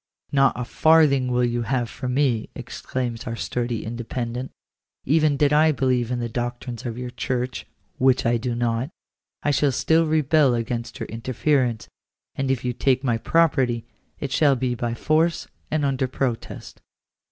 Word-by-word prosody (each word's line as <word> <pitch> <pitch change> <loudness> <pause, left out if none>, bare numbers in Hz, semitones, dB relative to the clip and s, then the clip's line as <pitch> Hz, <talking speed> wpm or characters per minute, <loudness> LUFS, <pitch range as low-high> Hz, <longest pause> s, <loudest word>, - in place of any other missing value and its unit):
" - - -46
Not 135 -2 +3
a 125 - -2
farthing 150 -3 +4
will 125 0 +2
you 120 0 -1
have 120 0 -1
from 125 +3 -4
me," 130 -6 +1
exclaims 120 -3 -4
our 115 - -3
sturdy 120 0 -3
Independent: 120 +2 -4 0.3
" - - -51
even 155 -3 +3
did 145 0 +3
I 155 +1 +5
believe 130 -4 +1
in 125 - -1
the 120 -1 -2
doctrines 120 +1 -4
of 115 -1 -5
your 125 0 -5
church 125 0 -3 0.3
(which 130 0 +3
I 120 +1 +3
do 120 +1 -3
not), 120 +2 -1 0.5
I 145 - +2
should 140 -2 +2
still 160 +4 +3
rebel 155 -3 +3
against 115 0 -4
your - - -4
interference; 125 0 0 0.5
and 135 -1 -2
if 130 -2 0
you 125 - 0
take 130 +1 +1
my 120 -4 +1
property, 130 -7 +2 0.3
it 140 - -4
shall 140 0 +4
be 125 0 -1
by 120 0 -2
force 160 +5 +1 0.2
and 150 -1 0
under 135 -1 0
protest." 125 -2 -4
125 Hz, 170 wpm, -23 LUFS, 120-140 Hz, 0.5 s, I